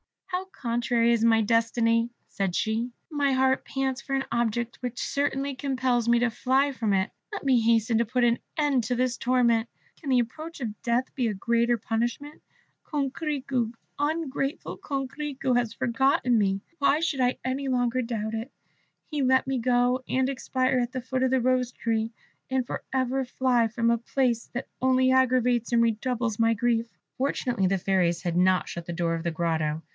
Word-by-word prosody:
"How 375 0 -3
contrary 235 -7 0
is 230 -1 +2
my 225 -1 +5
destiny!" 230 +1 +2 0.2
said 195 -3 -2
she. 225 +2 0 0.2
"My 285 -2 +1
heart 260 0 +2
pants 270 -1 -2
for 275 -1 -3
an 270 - 0
object 235 +2 -1
which 250 -1 -5
certainly 280 0 -1
compels 255 -3 0
me 235 0 +4
to 245 0 +2
fly 265 +5 +2
from 225 -6 -1
it. 190 -1 +1 0.2
Let 410 - -5
me 265 -3 +4
hasten 225 0 +2
to 235 - +2
put 250 +2 0
an 235 0 +3 0.2
end 285 -6 +2
to 245 - 0
this 250 0 0
torment. 235 -2 +2 0.3
Can 295 - -6
the 255 -2 +4
approach 310 +8 -4
of 220 -5 -5
death 240 +2 0
be 250 -4 0
a 215 - -1
greater 235 +4 +1
punishment? 235 +7 -3 0.4
Coquerico, 275 -4 -2 0.3
ungrateful 290 -1 -2
Coquerico, 275 -1 -2
has 240 -3 +1
forgotten 250 +1 +2
me. 195 -2 +1 0.2
Why 290 +2 +3
should 320 -5 -1
I 250 0 +2
any 265 +2 -2
longer 250 -1 +1
doubt 225 -2 -3
it? 225 +4 -4 0.6
Let 260 -3 +2
me 265 -1 -1
go 245 +1 +2
and 260 0 +1
expire 260 -1 0
at 245 +1 -2
the 255 - -3
foot 255 +1 -2
of 260 - +3
the 260 -1 +3
Rose 255 0 +1
tree, 225 -1 -1 0.4
and 260 -1 0
for - - -5
ever 260 0 0
fly 250 -2 +2
from 230 +1 +1
a 235 - +1
place 240 -1 0
that 245 - -4
only 260 0 +3
aggravates 250 -2 +2
and 235 - +5
redoubles 230 0 -1
my 230 0 +4
grief." 230 +1 +1 0.3
Fortunately 250 -6 0
the 195 +1 +1
fairies 180 -2 +1
had 175 -1 -1
not 185 0 +3
shut 170 -1 -6
the 175 - -3
door 170 -1 0
of 165 0 -3
the 170 - -1
grotto. 160 -1 -1
245 Hz, 180 wpm, -26 LUFS, 230-265 Hz, 0.6 s, my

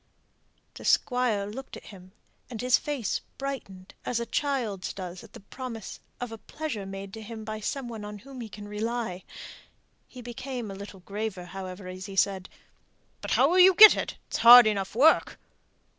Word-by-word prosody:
The - - -11
Squire 245 -5 +1
looked 255 +6 -8
at - - -13
him, 185 -1 -15 0.4
and 235 -3 -7
his 250 +1 +3
face 280 -8 -3 0.2
brightened 230 -9 -7
as 240 - -1
a 235 - -3
child's 235 -8 -2
does 180 -2 -8
at - - -16
the - - -10
promise 230 +1 -8 0.2
of 245 -2 -5
a 225 - -8
pleasure 260 -11 -6
made 195 0 -8
to 220 - -8
him 220 0 -8
by 215 0 -5
some 260 +4 -4
one 225 -3 -7
on 210 0 -7
whom 260 +3 -11
he 225 - -7
can 205 0 -10
rely. 215 -2 -3 0.8
He 250 -1 -12
became 245 -2 -6
a - - -6
little 195 -1 -10
graver, 200 -1 -5
however, 185 +1 -8
as 185 +2 -7
he 195 - -8
said, 190 -1 +1 0.7
"But - - -6
how - - +5
will 365 +2 +3
you 370 0 +8
get 430 +2 +11
it? - - -4
It's - - -3
hard 240 +1 +10
enough 200 -2 -1
work." 295 +7 +4
220 Hz, 185 wpm, -27 LUFS, 195-250 Hz, 0.8 s, get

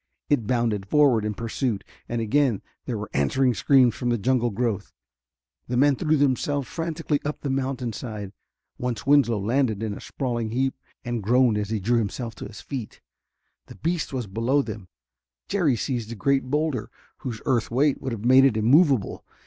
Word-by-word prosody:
It 120 -8 +1
bounded 115 -5 0
forward 135 -4 +4
in 105 0 -2
pursuit. 115 0 -2 0.3
And 120 -1 -1
again 120 -1 +1 0.2
there 120 -4 -3
were 105 +1 -6
answering 125 - +2
screams 130 -2 +4
from 120 - -3
the 120 - +2
jungle 120 +2 +1
growth. 115 -1 -2 0.8
The 125 - -1
men 140 +2 +4
threw 155 +2 +1
themselves 140 0 +1
frantically 165 -3 -2
up 150 +1 -4
the 140 - -2
mountainside. 120 -6 -3 0.5
Once 125 -3 -3
Winslow 135 -5 +4
landed 110 0 0
in 110 -2 -2
a - - -8
sprawling 120 -4 -3
heap 130 +3 0 0.3
and 120 -2 -2
groaned 120 +1 +3
as 105 -1 -3
he 110 -1 -1
drew 120 +5 +2
himself 115 +2 -3
to - - -6
his - - -11
feet. 130 -6 -6 0.7
The - - -11
beast 165 0 -2
was 130 -4 -3
below 115 +8 +1
them. 105 -7 -7 0.6
Jerry 175 -10 +2
seized 115 -1 -3
a - - -5
great 140 +4 +1
boulder, 150 -6 -1 0.3
whose 120 -6 -5
earth 120 -4 +1
weight 135 +4 +2
would 130 - -3
have 115 -1 -5
made 130 +2 +7
it 125 -5 +3
immovable. 130 - +3
125 Hz, 175 wpm, -25 LUFS, 110-140 Hz, 0.8 s, made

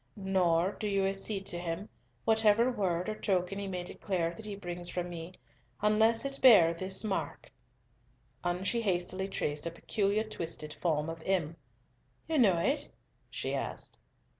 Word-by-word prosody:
Nor 185 -2 +2
do 215 - -2
you 195 -1 +1
accede 195 +1 -2
to 175 - -1
him, 175 +3 -4 0.4
whatever 225 +2 +4
word 185 -5 -1
or 215 - -1
token 195 -2 -1
he 200 - -4
may 180 -2 -3
declare 175 -2 -2
that 215 +4 -9
he 205 - -4
brings 175 -2 -5
from 180 0 -3
me, 170 +1 -7 0.5
unless 220 +3 +3
it 275 0 -2
bear 190 -10 +8
this 185 +4 +2
mark," 205 -3 -3 0.9
and 175 +1 -1
she 235 +3 +1
hastily 185 -1 -1
traced 150 -5 -2
a - - 0
peculiar 200 +5 0
twisted 165 -7 -5
form 155 -3 0
of 165 0 -6
M. 170 -4 0 0.7
"You 315 -2 +1
know 195 -8 +5
it?" 280 - 0 0.4
she - - -3
asked. - - -4
190 Hz, 160 wpm, -31 LUFS, 175-210 Hz, 0.9 s, bear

